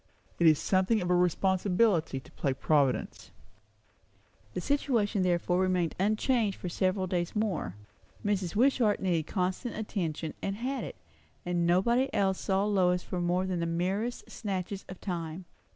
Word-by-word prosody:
It 170 - +5
is 155 -2 +6
something 190 +7 +2
of 180 -2 -1
a - - +5
responsibility 180 -2 +2
to - - -17
play 135 - -1
Providence." 140 -2 0 1.3
The - - -1
situation 230 -4 +1
therefore 180 0 +1
remained 185 -3 +1
unchanged 215 +1 +1
for 180 - -5
several 185 +2 0
days 175 0 -2
more. 190 - -1 0.5
Mrs. 195 -4 0
Wishart 235 -3 +3
needed 170 -5 0
constant 185 +5 -2
attention, 165 -7 -3
and 195 - -2
had 260 +5 -3
it; - - -6 0.5
and 175 -1 0
nobody 235 +10 +3
else 190 -1 +2
saw 195 +1 +1
Lois 180 -3 +2
for 180 - -3
more 175 +2 +1
than 185 -2 -2
the 170 - -1
merest 190 +8 -2
snatches 195 -2 -4
of 185 - -8
time. 170 -1 -4
185 Hz, 150 wpm, -30 LUFS, 175-205 Hz, 1.3 s, is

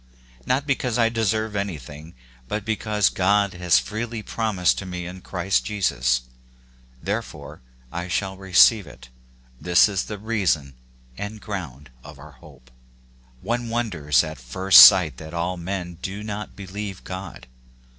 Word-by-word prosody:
Not 130 +3 +1
because 125 -4 -1
/deserve 110 -2 0
anything, 80 -5 -6 0.3
but 105 +7 -4
because 105 -2 0
God 100 +1 +1
has 90 -5 +2
freely 110 - -4
promised 105 -7 0
ir 100 - -8
to - - -7
me 90 -1 -5
in 90 +1 -9
Christ 95 +1 -1
Jesus, 65 - 0 0.8
therefore - - -5 0.3
I 90 +1 -5
shall 95 +1 -2
receive 95 +1 +4
it 65 -2 -14 0.5
this 90 +2 +4
is 100 -2 -2
the 105 - -6
reason 95 -10 -1 0.5
and 105 +1 -6
ground 75 -11 -7
of - - -12
our 75 +2 -13
hope. 65 -2 -18 0.7
One 120 +3 -2
wonders 90 - +1
at - - -7
first 90 +10 +6
sight 90 -5 +8
that 80 +1 -9
all 85 +2 -2
men 90 -1 -5
do 100 +2 -5
not 105 0 -6
believe 100 0 -7
God. 95 -8 -8
95 Hz, 140 wpm, -23 LUFS, 80-105 Hz, 0.8 s, sight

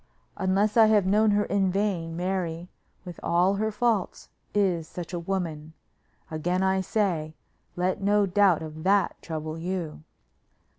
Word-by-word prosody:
Unless 200 +3 +1
I 220 -1 +8
have 210 -3 +4
known 210 +3 +3
her 205 0 +2
in 195 -2 +1
vain, 180 -5 -1
Mary, 175 -2 -3 0.4
with 175 -1 -8
all 180 +3 +2
her 220 +1 0
faults, 215 -2 -1 0.2
is 180 -6 +1
such 175 +1 -8
a 175 - -2
woman. 165 -4 -4 0.6
Again 175 +4 -1
I 190 0 +2
say, 175 -6 -1 0.4
let 185 +2 -1
no 205 +1 +3
doubt 190 -4 +3
of 155 0 -8
that 195 +1 +2
trouble 155 0 -5
you." 170 - -4
185 Hz, 145 wpm, -26 LUFS, 165-200 Hz, 0.6 s, I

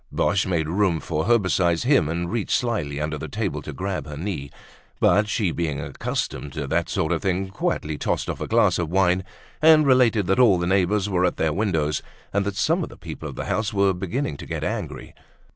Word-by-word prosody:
Boche 100 -2 +1
made 85 -4 0
room 90 -1 +1
for 75 0 -2
her 120 0 +5
beside 90 -4 +1
him 120 - +3
and 85 +1 -2
reached 115 -3 +1
slyly 100 -13 -2
under 75 0 -2
the - - -5
table - - -3
to - - -7
grab 95 -3 -4
her 75 -1 -7
knee. 80 -5 -4 0.5
But 105 +1 +3
she, 105 -5 0
being 80 -5 -2
accustomed 70 -2 -4
to 75 -1 -3
that - - -1
sort 80 - -1
of 85 - 0
thing, 95 -1 -1
quietly 75 -5 -2
tossed - - -1
off - - -4
a - - -3
glass - - +3
of 85 -3 -1
wine, 90 0 +2 0.4
and 155 -1 +7
related 125 -6 +4
that 95 +5 +1
all 115 -7 +6
the 85 - -1
neighbors 95 +2 +2
were 90 -3 +1
at 90 - +1
their 80 -1 +1
windows, 80 -7 0 0.3
and 100 0 +1
that 100 - -3
some 160 - +1
of - - -4
the - - -13
people 80 -1 -7
of 70 - -9
the - - -4
house 110 +2 -1
were 100 -1 +3
beginning 90 - -3
to - - -9
get - - -4
angry. - - -4
95 Hz, 220 wpm, -23 LUFS, 80-105 Hz, 0.5 s, and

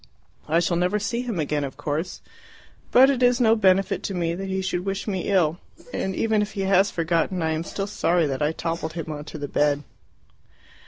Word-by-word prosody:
I 165 +2 +4
shall 170 0 +1
never 180 +4 +1
see 235 +3 -2
him 235 -8 -3
again, 150 -1 -1
of 135 -1 -6
course; 150 +4 -3 0.7
but 265 +3 +7
it 260 -2 -2
is 245 0 +4
no 225 -2 +5
benefit 195 -2 +2
to 195 - -4
me 170 -1 0
that 195 +3 -5
he 190 0 -2
should 180 -1 -2
wish 195 +2 -3
me 190 -4 -2
ill. 175 -4 +2 0.3
And 190 -1 -2
even 220 -2 +1
if 210 0 -3
he 200 - -3
has 195 +1 +3
forgotten, 170 +1 0
I 160 - +1
am 160 +1 -1
still 195 +3 -4
sorry 175 -4 +1
that 135 -1 -3
I 150 +1 +2
toppled 165 -1 -3
him 165 -2 -5
on 150 -1 -6
to 155 - -8
the 145 -1 -4
bed." 145 0 +1
180 Hz, 215 wpm, -24 LUFS, 160-200 Hz, 0.7 s, but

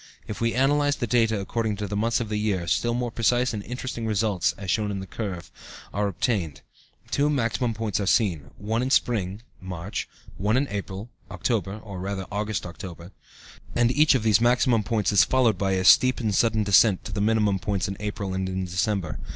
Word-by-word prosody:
If 105 0 -6
we 115 0 +1
analyze 145 +2 +2
the 120 - -2
data 115 -2 +2
according 110 +2 -2
to 105 +1 -4
the 100 - -4
months 115 +3 +1
of 120 - -3
the 105 -1 -1
year, 100 -5 -1
still 120 +7 0
more 120 -1 -2
precise 120 +2 +1
and 105 - -3
interesting 125 0 -5
results 105 -3 +1
(as 95 -3 -3
shown 105 -2 0
in 100 -1 -3
the 95 - -6
curve, 95 -5 -6
Chart - - -16
3) 100 - -3
are 105 - +2
obtained; 95 - -2 0.5
two 145 +1 +2
maximum 120 -3 0
points 110 -2 -2
are 100 - -2
seen, 85 - +1
one 110 +3 -1
in 130 - -1
spring 105 -5 0 0.2
(March), 95 +1 -5 0.3
one 105 +5 +1
in 140 +2 +1
autumn 100 +2 -5 0.2
(October, 100 -5 -2
or, 100 -4 -7
rather, 95 0 -4
August 105 -1 -2
October), 85 0 -9 0.6
and 120 0 +3
each 150 +2 +4
of 120 - 0
these 110 -1 +4
maximum 120 -1 +3
points 105 -2 0
is 100 - +6
followed 120 -7 +2
by; 95 -1 +1
a 95 0 0
steep 130 +5 +6
and 110 -4 -1
sudden 110 +1 +2
descent 100 -1 +4
to - - -6
the 100 +1 -2
minimum 105 -2 +2
points 95 +1 -1
in 95 - -4
April 105 -2 -4
and 95 0 -2
in 95 0 -2
December. 90 -2 -2
105 Hz, 210 wpm, -25 LUFS, 95-115 Hz, 0.6 s, is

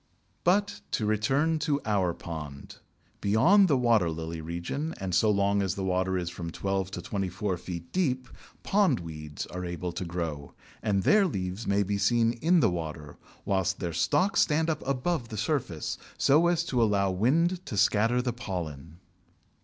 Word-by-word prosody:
But 200 +3 +2
to 110 - 0
return 135 +10 +1
to 150 -2 0
our 100 -5 +1
pond. 75 -4 -8 0.4
Beyond 170 - +5
the 145 -5 +3
water 115 -8 +3
lily 80 0 -5
region 85 - -4
and 95 -2 -3
so 110 +5 +4
long 100 0 +2
as 95 -2 -1
the 95 - -3
water 95 0 0
is 85 -1 -3
from 85 -1 -6
twelve 95 +2 -2
to - - -6
twenty 95 -2 -2
four 95 +1 -2
feet 85 -1 -7
deep, 130 -9 0 0.4
Pondweeds 85 - 0
are 90 0 -4
able 85 0 -4
to 90 - -4
grow, 85 -5 -5 0.3
and 100 -2 +1
their 210 -2 +5
leaves 95 - -4
may 100 +1 +2
be 100 +1 -2
seen 115 +3 +3
in 165 +8 +3
the 110 - +3
water, 75 -4 -6 0.3
whilst 95 -1 0
their 85 -3 -3
stalks 195 - +2
stand 160 +1 +2
up 155 - -4
above 135 -1 -1
the 110 - -6
surface 105 - -2 0.2
so 155 +5 +4
as 175 -1 +2
to 125 -8 0
allow 100 -3 +2
wind 165 - +1
to 105 - -4
scatter 115 +5 +3
the 125 -2 -1
pollen. 85 - -6
100 Hz, 170 wpm, -28 LUFS, 90-135 Hz, 0.4 s, Beyond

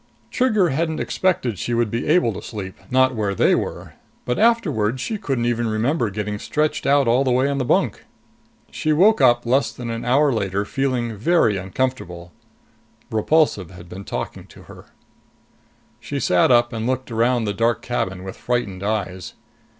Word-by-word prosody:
Trigger 215 -8 +2
hadn't 160 +2 -1
expected 130 - -1
she 120 - -2
would 115 -3 0
be 115 - -2
able 155 -8 +3
to - - -7
sleep, 95 -4 -7 0.2
not 130 0 +3
where 105 -4 -2
they - - +3
were. - - -3 0.3
But 125 - -1
afterwards 150 - +2
she 215 - -3
couldn't 135 - -1
even 120 -1 0
remember 115 +3 0
getting 105 +1 -4
stretched 150 +4 -1
out 140 -2 +4
all 120 +3 +3
the 130 - 0
way 130 +2 +2
on 140 0 -1
the 130 - -1
bunk. - - +1 0.7
She 155 - 0
woke 195 +3 +4
up 120 -2 +4
less 130 +4 +2
than 120 -2 -6
an 115 0 -4
hour 140 +3 +3
later, 100 -2 -1
feeling 125 -2 -2
very 115 - +2
uncomfortable. 95 -3 -3 0.8
Repulsive 110 - +1
had 90 -1 -13
been 95 +3 -9
talking - - -6
to - - -15
her. - - -14 1.1
She - - -4
sat 90 -1 +3
up 120 -1 +4
and 115 0 -3
looked 130 -1 -2
around 120 +1 +1
the 105 -2 -1
dark 115 +2 0
cabin 95 -6 -3
with 95 0 -7
frightened 115 -7 -2
eyes. 100 -3 -3
120 Hz, 175 wpm, -21 LUFS, 105-140 Hz, 1.1 s, out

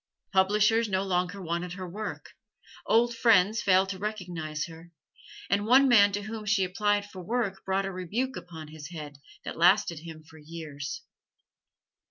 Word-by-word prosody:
Publishers 210 +4 +3
no 190 0 0
longer 180 0 -1
wanted 175 0 -3
her 185 -1 -6
work, 210 +5 -6 0.6
old 235 +1 +3
friends 220 -3 +4
failed 190 0 +3
to 190 -1 -5
recognize 175 -7 -4
her, 165 0 -13 0.6
and 205 +2 0
one 265 +3 +6
man 205 -5 +6
to 205 +1 -2
whom 215 +1 -6
she 200 -1 +3
applied 205 +2 0
for 190 -2 -10
work 200 -1 -2
brought 195 +1 0
a 195 - -3
rebuke 210 +9 -3
upon 160 -3 -9
his 155 -1 -9
head, 150 -4 -8 0.3
that - - -6
lasted 175 -2 +4
him 160 -1 -10
for 160 0 -16
years. 150 -3 -7
190 Hz, 160 wpm, -28 LUFS, 170-210 Hz, 0.6 s, one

